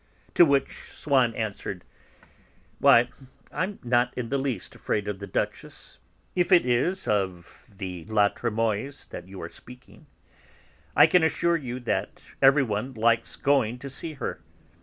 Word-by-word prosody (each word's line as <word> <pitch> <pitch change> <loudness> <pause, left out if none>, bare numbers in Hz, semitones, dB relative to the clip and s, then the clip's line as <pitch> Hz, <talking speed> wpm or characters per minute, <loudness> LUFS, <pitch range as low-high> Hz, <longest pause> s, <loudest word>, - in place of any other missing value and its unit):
To 175 - +7
which 140 -2 0
Swann 130 -6 +1
answered: 100 -4 -4 1.0
"Why, 120 +1 +6 0.4
I'm 185 +6 -2
not 120 0 +2
in 120 -2 -3
the 140 - 0
least 135 -3 -3
afraid 105 -1 -2
of 105 -2 -4
the 100 - -7
Duchess - - -5 0.4
(if 180 0 +1
it 175 -6 +6
is 125 +10 0
of 95 -4 -2 0.2
the 90 -3 -6
La 105 0 +3
Trémoïlles 115 +4 -2
that 90 - -8
you're 95 -3 -8
speaking). 125 +6 -15 0.9
I - - +8
can 180 - +4
assure 170 +1 +2
you 130 -5 -4
that 120 - -2 0.2
everyone 135 -3 +3
likes 115 +1 +1
going 130 -4 +1
to 140 +2 -8
see 160 +4 -6
her. 140 - -5
120 Hz, 140 wpm, -26 LUFS, 105-140 Hz, 1.0 s, I